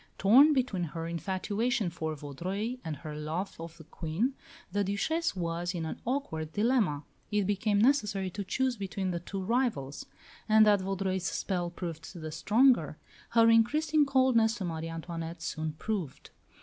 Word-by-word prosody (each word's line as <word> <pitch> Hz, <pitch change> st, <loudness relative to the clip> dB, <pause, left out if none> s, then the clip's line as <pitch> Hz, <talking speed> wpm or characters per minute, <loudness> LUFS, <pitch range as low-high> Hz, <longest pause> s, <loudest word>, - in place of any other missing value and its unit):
Torn 260 Hz, +10 st, +7 dB
between 250 Hz, -9 st, 0 dB
her 165 Hz, +1 st, -5 dB
infatuation 200 Hz, +5 st, -1 dB
for 160 Hz, -2 st, -3 dB
Vaudreuil 185 Hz, -, -4 dB
and 160 Hz, -3 st, -4 dB
her 150 Hz, +1 st, -8 dB
love 155 Hz, +6 st, -4 dB
of 165 Hz, 0 st, -8 dB
the 160 Hz, -, -12 dB
Queen, 165 Hz, -, -2 dB, 0.4 s
the 205 Hz, +2 st, +1 dB
Duchesse 205 Hz, -, 0 dB
was 175 Hz, 0 st, -2 dB
in 165 Hz, -2 st, -2 dB
an 160 Hz, -, -6 dB
awkward 160 Hz, -, -2 dB
dilemma. 210 Hz, -, +1 dB, 0.3 s
It 205 Hz, -1 st, +1 dB
became 205 Hz, +1 st, +1 dB
necessary 210 Hz, -6 st, +2 dB
to 200 Hz, +3 st, -4 dB
choose 255 Hz, +6 st, 0 dB
between 195 Hz, -1 st, -3 dB
the 170 Hz, -, -2 dB
two 190 Hz, +3 st, -5 dB
rivals; 220 Hz, -, -1 dB, 0.4 s
and 215 Hz, 0 st, +7 dB
that 205 Hz, -2 st, +4 dB
Vaudreuil's 190 Hz, -1 st, -2 dB
spell 180 Hz, -3 st, -2 dB
proved 170 Hz, -2 st, -6 dB
the 160 Hz, -2 st, -6 dB
stronger, 215 Hz, -, +3 dB, 0.4 s
her 230 Hz, 0 st, +7 dB
increasing 295 Hz, +6 st, +3 dB
coldness 255 Hz, -4 st, +3 dB
to 195 Hz, -, -4 dB
Marie 165 Hz, -1 st, -4 dB
Antoinette 165 Hz, 0 st, -6 dB
soon 155 Hz, 0 st, -3 dB
proved. 175 Hz, -4 st, -4 dB
190 Hz, 155 wpm, -30 LUFS, 165-225 Hz, 0.4 s, Torn